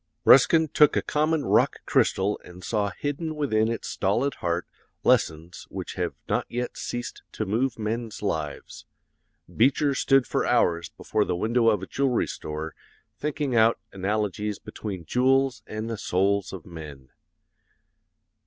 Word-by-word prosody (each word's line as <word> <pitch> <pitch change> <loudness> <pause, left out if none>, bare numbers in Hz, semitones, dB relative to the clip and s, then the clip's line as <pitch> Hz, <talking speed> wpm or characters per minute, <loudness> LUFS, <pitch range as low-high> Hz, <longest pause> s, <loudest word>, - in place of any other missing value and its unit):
"Ruskin 160 +5 +7
took 150 0 +4
a - - +1
common 155 0 0
rock - - +3
crystal 100 +2 +2
and 90 +1 -12
saw 105 -3 0
hidden 145 - -4
within 110 -8 +1
its 115 - -4
stolid 120 +8 0
heart 85 0 -1 0.4
lessons 80 +2 +1
which - - -6
have - - -3
not - - 0
yet 125 +1 -3
ceased 120 0 -5
to 110 - -2
move 115 +5 0
men's 110 0 -4
lives. 80 -7 -4 0.7
Beecher 140 +4 +3
stood 135 -1 +3
for - - 0
hours 85 -9 +2
before 105 - -1
the 90 - -1
window 115 +5 +2
of 105 -4 +1
a - - -2
jewelry 135 +2 +1
store 75 +1 -6 0.5
thinking 145 -3 -2
out 115 0 +5 0.2
analogies 105 +1 -2
between 95 -6 -7
jewels 130 - +2
and 110 +1 -4
the 115 -2 -4
souls 100 +2 +1
of 95 -4 -8
men. 75 -6 -10
110 Hz, 145 wpm, -26 LUFS, 95-130 Hz, 0.7 s, Ruskin